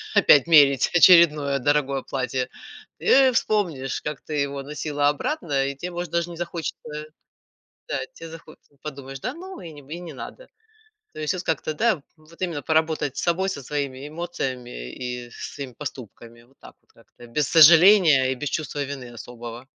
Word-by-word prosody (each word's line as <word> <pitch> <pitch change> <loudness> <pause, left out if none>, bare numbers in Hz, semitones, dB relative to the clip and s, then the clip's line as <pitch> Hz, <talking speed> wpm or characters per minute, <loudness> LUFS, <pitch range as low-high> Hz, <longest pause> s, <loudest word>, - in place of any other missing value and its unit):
опять 145 0 +6
мерить 140 -5 +5
очередное 155 -6 +6
дорогое 140 0 +1
платье, 130 -1 -3 0.5
ты 265 -1 +5
вспомнишь, 175 - -1
как 150 -3 -5
ты 155 - -8
его 140 -1 -2
носила 145 0 -1
обратно, 145 - -1
и 140 - -4
те, 175 +6 -6
может, 175 -1 -5
даже 170 0 -1
не 170 - -9
захочется 170 -1 -5 1.1
да - - -1
те 165 - -10
захоче 165 -1 -13 0.2
подумаешь, 135 -3 -8
да, 250 - -3
ну, 375 +4 -10
и 170 - -8
и 150 +2 -9
не 170 - -8
надо. 140 - -10 0.7
То - - -9
есть 150 - 0
вот 180 - -4
как-то, 155 -1 -2
да, 215 -4 +1
вот 155 +2 -20
именно 165 -6 -2
поработать 160 -2 0
с - - -3
собой, 185 +3 0
со 140 -7 -4
своими 140 0 -4
эмоциями 130 - -5
и 125 -1 -6
со - - -8
своими 140 -3 -7
поступками. 120 -4 -9
Вот 130 +3 -27
так - - -14
вот - - -33
как-то, 120 - -18
без 135 +3 -1
сожаления 165 -4 +7
и - - -1
без 145 +3 -4
чувства 145 -1 -3
вины 135 -3 -7
особого. 120 +1 -9
145 Hz, 170 wpm, -23 LUFS, 135-170 Hz, 1.1 s, сожаления